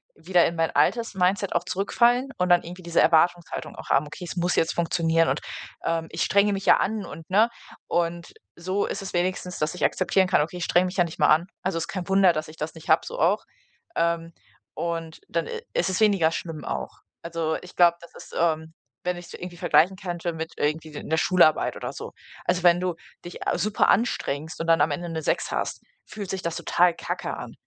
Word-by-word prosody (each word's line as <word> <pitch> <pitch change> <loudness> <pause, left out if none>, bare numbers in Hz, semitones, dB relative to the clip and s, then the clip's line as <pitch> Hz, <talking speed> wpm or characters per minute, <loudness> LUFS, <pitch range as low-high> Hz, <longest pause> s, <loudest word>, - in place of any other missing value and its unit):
wieder 175 +2 +3
in 170 - -1
mein 165 -1 +1
altes 230 +2 +2
Mindset 190 +1 +1
auch 175 - +2
zurückfallen 235 +8 +2
und 180 0 0
dann 175 0 +6
irgendwie 180 +2 -9
diese 170 0 +2
Erwartungshaltung 170 +2 +2
auch - - -10
haben: - - +3
"Okay, 150 +4 -8
es - - -6
muss 175 0 0
jetzt 165 - +2
funktionieren 165 -1 +2
und, - - -1 0.4
ähm, 165 -1 -1
ich - - -1
strenge 200 +1 +3
mich 195 0 -4
ja - - +7
an" 215 0 -1
und 165 0 -10
ne? 215 +5 +4 0.4
Und 170 0 -1 0.2
so 185 +4 -1
ist - - -4
es 195 - -7
wenigstens, 180 0 -1
dass 150 +3 -1
ich 180 - -5
akzeptieren 190 0 +2
kann: 180 - +3
„Okay, 160 +4 -3
ich 170 - -2
strenge 175 +2 +3
mich 185 +1 -5
ja 175 - +5
nicht 165 -2 -7
mal - - +5
an. 160 +3 +4 0.2
Also 185 -2 -1
ist 165 - -3
kein 185 -3 -5
Wunder, 195 -1 +5
dass 155 -1 -3
ich 155 +1 -13
das 155 +2 -5
nicht 160 - -12
habe,“ - - +6
so - - -6
auch. - - +2 0.5
Ähm, 170 0 0 0.4
und 165 -1 -4
dann, - - -1
äh, 470 -1 -4
i 460 - -20
ist - - +1
es 185 - -1
weniger 195 -7 +4
schlimm 165 -2 -5
auch. - - -5 0.2
Also, 165 -1 -2
ich 180 - -13
glaube, 170 -1 +5
das 170 - -14
ist, - - -12
ähm 160 -1 0 0.3
wenn 180 0 -1
ich's 175 - -11
irgendwie 175 -1 -8
vergleichen 185 +3 +3
könnte 175 -1 -3
mit 160 +1 -5
irgendwie 155 +1 -1
'ner 160 - -1
Schularbeit 170 -2 +3
oder - - -5
so. - - -8 0.3
Also, 180 0 0
wenn 175 0 +6
du 180 -1 -1 0.3
dich, 175 - -8
äh, - - +1
super 215 0 +1
anstrengst 160 - 0
und 165 - -4
dann 165 0 +5
am 150 +1 +3
Ende 170 +4 -3
'ne 160 -1 -3
6 - - 0
hast, - - -2 0.2
fühlt 205 -3 -7
sich 190 -1 -3
das 170 -1 -2
total 175 0 +3
kacke - - -4
an. - - -8
175 Hz, 225 wpm, -25 LUFS, 165-185 Hz, 0.5 s, ja